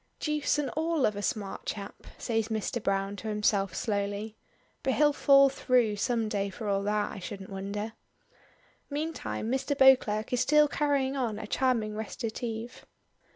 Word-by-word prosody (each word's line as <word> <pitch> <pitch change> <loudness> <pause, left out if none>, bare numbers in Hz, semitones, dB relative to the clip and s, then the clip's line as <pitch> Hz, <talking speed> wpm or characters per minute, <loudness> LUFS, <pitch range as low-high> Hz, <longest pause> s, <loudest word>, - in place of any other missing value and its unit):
"Deuce 300 -1 0
and 295 -2 -1
all 320 -2 +1
of 210 - 0
a 205 - -4
smart 200 -1 -3
chap," 200 -1 -6
says 225 -2 -1
Mr. 220 +2 -2
Browne 195 0 -1
to 220 - -7
himself 210 -3 +1
slowly. 205 0 -2 0.5
"But 265 - 0
he'll 295 -1 +4
fall 275 -1 +6
through 250 -5 +1
some 230 +1 0
day 200 -2 -1
for 215 +2 -7
all 195 -1 +1
that, 210 +1 0
I - - -7
shouldn't 195 +1 -7
wonder." 200 +3 -4 1.0
Meantime 295 -6 -3
Mr. 270 +2 -1
Beauclerk 250 -5 +4
is 250 - +2
still 300 +3 +5
carrying 285 -2 0
on 235 -6 -1
a 215 - -6
charming 225 -2 0
recitative. 225 +2 -5
225 Hz, 155 wpm, -29 LUFS, 205-265 Hz, 1.0 s, fall